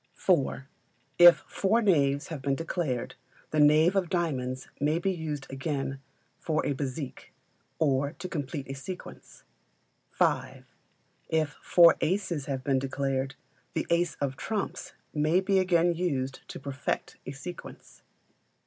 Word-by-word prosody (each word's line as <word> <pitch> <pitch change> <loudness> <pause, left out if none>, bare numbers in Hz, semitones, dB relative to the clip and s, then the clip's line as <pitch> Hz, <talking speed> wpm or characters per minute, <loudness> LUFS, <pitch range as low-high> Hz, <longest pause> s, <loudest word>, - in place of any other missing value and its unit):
iv. 145 -7 +2 0.6
If 175 0 +10
four 205 +4 +1
knaves 145 -10 +2
have 155 -5 -5
been 135 +1 0
declared, 150 -6 -2 0.4
the 155 - +1
knave 155 +5 +5
of 185 -4 +1
diamonds 130 -7 -2
may 150 +3 +2
be 190 +3 0
used 155 -5 -4
again 135 -1 -3 0.4
for 155 -1 -1
a 145 - +1
bézique, 135 0 -5 0.5
or 140 -1 +1
to 175 +2 -7
complete 145 -4 -4
a 135 - -5
sequence. 180 +7 -9 0.7
v. - - +1 0.7
If 160 -2 +1
four 170 -1 +6
aces 170 -5 -1
have 135 -2 -3
been 135 -1 +2
declared, 135 0 -2 0.4
the - - 0
ace 170 -1 +2
of 135 -2 -3
trumps 215 -2 -4 0.2
may 155 +4 +3
he 195 -1 +3
again 175 -2 +3
used 140 -7 -2
to - - -8
perfect 140 -1 -4
a - - -3
sequence. 170 +6 -10
150 Hz, 135 wpm, -28 LUFS, 135-175 Hz, 0.7 s, If